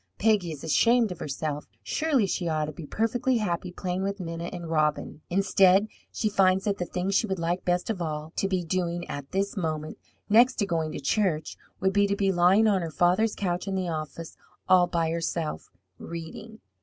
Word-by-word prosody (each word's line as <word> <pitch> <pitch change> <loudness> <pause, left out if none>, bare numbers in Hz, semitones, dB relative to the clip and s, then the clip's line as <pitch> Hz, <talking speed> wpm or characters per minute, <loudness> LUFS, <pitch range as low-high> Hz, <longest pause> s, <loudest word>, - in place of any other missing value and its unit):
Peggy 205 -5 +2
is 150 -3 -8
ashamed 230 +6 +3
of 175 - -7
herself; 150 0 -4 0.2
surely 295 -8 +1
she 185 -2 -2
ought 155 -2 0
to 155 - -5
be 150 0 -9
perfectly 235 - 0
happy 180 -4 -2
playing 180 0 -3
with 200 +1 -2
Minna 165 -1 -5
and 175 -1 -6
Robin. 155 -1 0
Instead, 195 +1 +4 0.3
she 215 - -1
finds 190 -2 +3
that 205 -2 -1
the 180 - -2
thing 185 +2 -2
she 210 +3 +2
would 190 -1 -2
like 170 +2 -1
best 180 0 0
of 215 -5 -2
all 155 -1 -4
to 195 - +1
be 185 -2 -1
doing 175 0 -2
at 145 -1 -6
this 195 +1 -1
moment, 155 -4 -3 0.3
next 240 +4 +5
to 205 - 0
going 165 -4 -1
to - - -4
church, 155 0 0 0.2
would 190 +1 +1
be 205 0 +3
to 200 - 0
be 195 -1 +1
lying 185 +4 +4
on 200 -4 +3
her 165 - -3
father's 180 +7 +2
couch 180 0 -2
in 195 - -1
the 185 -2 -1
office, 160 +1 -5 0.3
all 185 -1 +5
by 165 -2 0
herself, 165 -1 -3 0.3
reading. 170 +7 -8
180 Hz, 200 wpm, -27 LUFS, 165-200 Hz, 0.3 s, next